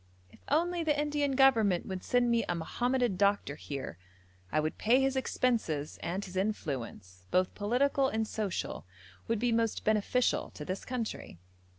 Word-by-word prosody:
'If - - -20
only 340 +3 +1
the 300 -2 +1
Indian 295 -1 0
Government 225 -9 +4
would 190 -1 -5
send 245 -1 +2
me 230 -1 +3
a 175 - +1
Mohammedan 240 +5 0
doctor 200 -6 +2
here, 135 - -6 0.5
I - - +2
would 155 +1 -2
pay 240 +4 +4
his 270 0 +1
expenses, 225 - -1
and 185 +4 -3
his 185 -1 -10
influence, 125 - -4
both 185 0 +2
political 265 +6 +2
and 220 -3 -1
social, 200 - -3 0.4
would 230 - +1
be 240 +3 +1
most 230 -1 0
beneficial 215 +4 +1
to 150 - -7
this 185 +3 -4
country.' 235 - -4
220 Hz, 160 wpm, -31 LUFS, 180-255 Hz, 0.5 s, Government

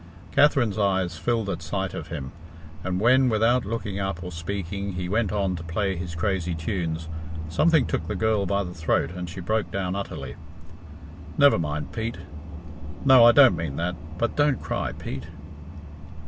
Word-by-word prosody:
Katherine's 135 -7 +3
eyes 95 -4 +1
filled 115 +3 0
at 95 -4 -3
sight - - -3
of - - -6
him, 70 -5 -6 0.5
and 95 0 -1
when, 130 +4 +5
without 115 +2 +2
looking 105 -2 -3
up 95 -3 -3
or 90 - -6
speaking, 100 +3 -4
he 90 0 -3
went 105 +1 0
on 100 -3 0
to 80 - -7
play 95 +4 -1
his 85 -1 -5
crazy 90 0 -1
tunes, 80 -1 -3 0.4
something 155 - +3
took - - -2
the 105 - -2
girl 105 -1 +1
by 100 +2 +1
the 90 -1 -7
throat 80 0 0
and 90 -1 -6
she 90 +2 -7
broke 110 +4 -1
down 95 -1 -2
utterly. 100 0 -5 1.0
"Never 140 -8 +6
mind, 75 -2 -3
Pete. 115 -1 -3 0.9
No 130 -3 +8
I 120 - +9
don't 135 0 +7
mean 80 -5 -4
that 85 +3 -2 0.2
but 115 +5 -1
don't 145 -3 +2
cry, - - -2
Pete." 70 +3 -6
95 Hz, 170 wpm, -25 LUFS, 85-110 Hz, 1.0 s, I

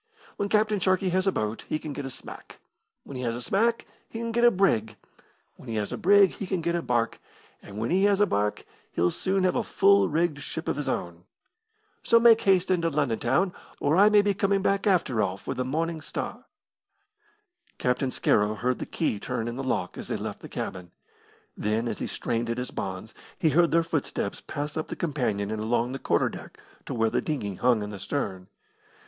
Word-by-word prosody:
When 200 - -2
Captain 215 -1 +2
Sharkey 185 +1 +2
has 185 +2 +1
a - - +4
boat 110 - -3
he - - 0
can 155 -1 -6
get 140 -1 -5
a - - -5
smack, 130 - -10 0.5
when 140 - -10
he - - -4
has 115 -2 -1
a 120 - -5
smack 230 - +1 0.2
he - - -7
can 230 0 -3
get 235 +1 +1
a 240 - +9
brig, 115 - +1 0.6
when 125 - -12
he 115 - -3
has 105 -1 -2
a - - -1
brig 200 0 +6
he 195 - -6
can 185 -1 -1
get 170 +1 -1
a 170 - 0
barque, 120 -5 0 0.4
and 100 - -11
when 115 +6 -2
he 190 +3 +3
has 200 -1 +3
a 205 - +6
barque 105 - -1 0.3
he'll 85 +1 +2
soon 190 0 0
have 185 - +2
a 245 - +2
full 200 -2 +4
rigged 160 -1 0
ship 160 +3 -6
of - - 0
his 145 - -3
own 85 0 -4 0.8
so 230 - +5
make 230 -1 +6
haste 190 -1 +3
into 170 -2 +2
London 140 -7 0
town, 155 +10 +1 0.3
or 145 +2 +2
I 200 +3 +7
may 210 -1 +5
be 205 -1 +2
coming 195 0 +1
back, 200 +1 +1
after 155 - +2
all, 95 -1 -1
for - - -5
the 125 - -2
Morning 160 +5 -2
Star." 240 - -5 1.3
Captain 125 +1 0
Scarrow 105 -3 +2
heard 125 +3 -1
the - - -5
key 130 -10 -1
turn 120 -1 -3
in 120 - -4
the 135 - -4
lock 130 - -2
as - - -7
they - - -2
left - - -5
the - - -10
cabin. 90 -1 -5 0.7
Then, 110 +3 -1
as - - -3
he - - -3
strained 115 -1 -2
at 115 - -1
his 125 0 -4
bonds, 95 +3 -5 0.2
he 160 - +2
heard 170 +3 +4
their 165 0 +3
footsteps 150 -10 -3
pass 145 0 -5
up 155 - -3
the - - -5
companion 115 - -1
and 110 -1 -3
along 120 +2 0
the 135 - -5
quarter - - +2
deck - - -10 0.3
to - - -3
where 115 -1 +1
the - - +1
dinghy 130 -11 -3
hung 115 +2 +2
in 105 - -6
the 100 - -7
stern. 95 -5 -3
145 Hz, 220 wpm, -27 LUFS, 115-190 Hz, 1.3 s, a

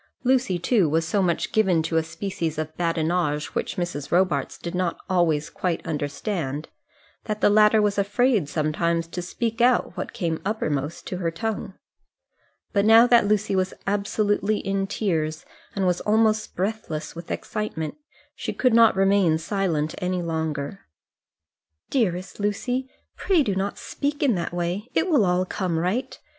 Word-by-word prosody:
Lucy, 250 -7 +2
too, 180 -1 +2
was 160 +2 +1
so 200 +4 +1
much 175 -3 0
given 190 -7 +3
to 165 +1 -2
a 160 - +4
species 165 -1 -4
of 155 0 -4
badinage 165 -2 0
which - - -2
Mrs. 170 -5 -3
Robarts 185 +1 +1
did 170 - -6
not 180 -2 -1
always 165 -6 +1
quite 180 -3 -2
understand, 150 -1 -3 0.6
that 215 -1 -3
the 205 - +4
latter 210 +1 +5
was 205 0 +1
afraid 205 - +2
sometimes 165 +2 0
to 180 +2 -5
speak 230 +6 -3
out 245 -6 +3
what 185 - -4
came 170 -8 -2
uppermost 155 -7 -2
to 180 - -4
her 175 -2 -1
tongue. 195 +3 -4 1.0
But 200 -2 +3
now 225 +2 +8
that 240 -3 +5
Lucy 210 -1 +1
was 185 0 0
absolutely 205 +1 0
in 195 -1 -1
tears, 160 -7 -1 0.3
and 195 -1 0
was 180 -1 +1
almost 215 0 +2
breathless 185 -6 -3
with 170 0 -9
excitement, 160 -8 -3 0.4
she - - -4
could 255 -3 +2
not 230 -2 +6
remain 195 -4 +3
silent 165 -3 -1
any 180 -1 -1
longer. 160 0 -3 1.1
"Dearest 185 -8 -1
Lucy, 245 +6 -1 0.3
pray 360 -6 +2
do 205 - 0
not 195 +1 -2
speak 290 +1 -3
in 270 -5 +4
that 175 -3 -2
way; 175 +6 -3
it - - +2
will 300 - +4
all 180 0 +2
come 180 -3 -2
right. 185 +10 -1
185 Hz, 155 wpm, -24 LUFS, 165-215 Hz, 1.1 s, now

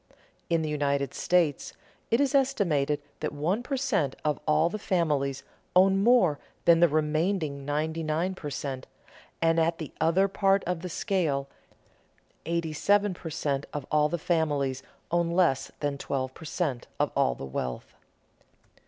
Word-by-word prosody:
In 165 -1 +2
the 155 - -2
United 140 -2 0
States 170 -6 +1 0.4
it 230 - +3
is 280 0 +2
estimated 160 - +1 0.2
that - - -2
one 165 +10 -1
per 270 +2 -3
cent. 200 - 0
of 150 -1 +1
all 155 +1 +4
the 215 +5 -4
families 145 -8 0 0.3
own 195 +1 +5
more 220 - +4 0.3
than 170 -1 +6
the 175 - +6
remaining 155 -1 0
ninety 155 +3 -1
nine 160 +4 -1
per 155 -5 -6
cent.; 135 -2 -5 0.6
and 165 0 +3
at 165 +1 +1
the 155 - -6
other 170 +5 +3
part 195 0 +2
of 180 -2 -2
the 180 - -5
scale 165 -8 -1 1.0
eighty 170 -1 -1
seven 205 +5 +2
per 170 -1 -8
cent. 145 -2 -2
of 145 -3 -4
all 150 0 +3
the 175 - -1
families 145 -6 0 0.3
own 170 0 +2
less 170 -7 +2
than 145 -1 -2
twelve 130 -2 -3
per 160 - -12
cent. 145 -6 -2
of - - +1
all 60 - +2
the - - -7
wealth. 65 -2 -5
160 Hz, 160 wpm, -28 LUFS, 145-180 Hz, 1.0 s, than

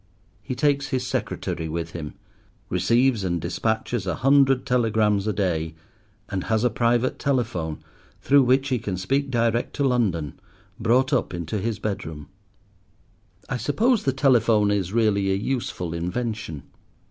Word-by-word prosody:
He 130 - -5
takes 140 +1 +1
his 130 -2 -2
secretary 80 -9 -3
with 85 +1 -4
him, 80 -4 -7 0.5
receives 115 +5 +2
and 85 -2 -1
despatches 100 +5 -2
a 90 - 0
hundred 135 -1 +3
telegrams 110 -4 +2
a - - +2
day, 85 -5 -1 0.5
and 95 -2 -3
has 110 0 +1
a 125 - +2
private 120 +2 +1
telephone, 115 - -1 0.4
through 140 0 +4
which 130 +2 +2
he 125 -2 +1
can 95 -3 -4
speak 135 +10 0
direct 115 -1 0
to 145 - 0
London, 95 - 0 0.4
brought 125 +5 +2
up 120 -8 0
into 85 +5 -3
his 110 +1 -2
bedroom. 80 -8 -5 1.2
I 130 - -2
suppose 215 - +2
the 135 - +1
telephone 115 -6 +3
is 95 -3 -1
really 100 -3 +2
a - - +2
useful 100 -6 -3
invention. 90 - -3
110 Hz, 145 wpm, -24 LUFS, 90-130 Hz, 1.2 s, through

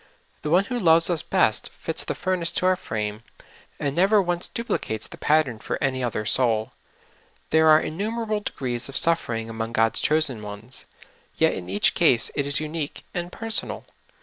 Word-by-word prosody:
The 150 - -3
One 180 +5 +4
who 245 +3 -3
loves 165 -2 +4
us 165 - +1
best - - +1
fits - - -2
the - - -4
furnace 185 -3 +1
to 180 - 0
our 185 0 +4
frame, 105 - -4 0.6
and 140 -2 -2
never 195 +4 +4
once 175 -2 0
duplicates 110 - -3
the - - -10
pattern 150 -7 +2
for - - -3
any 130 -3 -1
other 110 -3 -2
soul. 110 -2 +1 0.8
There 160 0 +5
are 155 0 +8
innumerable 215 +6 -2
de 210 - -5
grees 125 -1 -2
of 135 - -3
suffering 120 -9 0
among 115 0 -5
God's 115 -1 +2
chosen 150 -7 +1
ones, 105 +4 -5 0.5
yet - - +3
in 90 - -7
each 100 +2 +2
case 130 -9 +3
it 140 -1 -1
is 140 - +1
unique 155 -1 -4
and 175 0 -4
personal. 225 +2 -1
150 Hz, 175 wpm, -24 LUFS, 115-175 Hz, 0.8 s, are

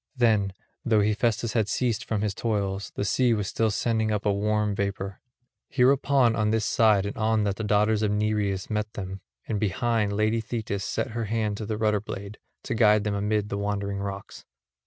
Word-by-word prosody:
Then, 110 -5 +2 0.3
though 110 -3 +3
Hephaestus 110 +2 0
had 110 -3 +1
ceased 120 +1 0
from 110 -2 -1
his 105 -2 -1
toils, 100 -3 -2
the 100 - -2
sea 120 +3 +2
was 105 -2 -2
still 110 +1 +1
sending 110 +1 0
up 105 -1 -1
a 105 - +3
warm 105 +1 0
vapour. 100 -1 -3 0.5
Hereupon 135 -2 +3
on 110 -1 +1
this 110 -1 +1
side 105 -3 +3
and 100 - -4
on 110 -1 +2
that 100 -1 -1
the 110 - -3
daughters 105 0 +2
of 105 - +1
Nereus 105 -2 0
met 105 -1 -2
them; 95 -1 -6 0.3
and 110 -3 -1
behind, 105 +1 0
lady 110 +2 +1
Thetis 110 -3 -3
set - - -2
her 115 0 -3
hand 105 -1 -1
to 110 - -5
the 110 -1 -2
rudder 105 -2 +1
blade, 100 0 -7 0.2
to - - -3
guide 105 -2 +4
them 105 -1 -1
amid 105 +1 0
the 100 - -3
Wandering 100 -1 -2
rocks. 100 0 -6
105 Hz, 195 wpm, -26 LUFS, 100-110 Hz, 0.5 s, guide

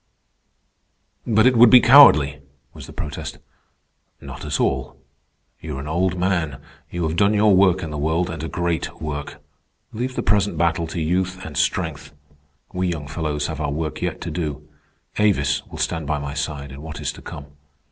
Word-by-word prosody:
_" 115 - 0
"But 110 +2 +5
it 125 0 +5
would 120 0 +8
be 125 - +9
cowardly," 75 - +7 0.3
was - - -11
the - - -10
protest. 75 -2 -6 0.8
"Not - - -9
at 75 -3 -2
all. 65 - -1 0.6
You 75 -4 -6
are - - -5
an 70 - -7
old 90 +3 0
man. 85 -7 -1 0.3
You 85 0 -4
have 80 - -3
done 100 +3 +3
your 105 -1 +4
work 95 0 +3
in 80 - -5
the 75 - -4
world, 80 +4 0
and 80 -2 -6
a - - -3
great 85 -1 -3
work. 75 -1 -6 0.5
Leave 125 +3 -3
the - - -2
present 100 -3 +1
battle 85 0 +1
to 85 - -5
youth 95 +3 -1
and - - -8
strength. 70 - -2 0.6
We 90 0 -1
young 80 -5 -4
fellows 75 0 -3
have 80 0 -4
our 75 - -1
work 75 0 -4
yet - - -2
to - - -5
do. 75 -4 -4 0.5
Avis 70 -12 +2
will - - -10
stand 80 -3 -2
by 75 +1 0
my 70 0 -5
side 70 -1 -4
in 70 +1 -10
what 80 +1 -8
is - - -2
to - - -13
come. 75 -4 -9
80 Hz, 190 wpm, -22 LUFS, 75-95 Hz, 0.8 s, be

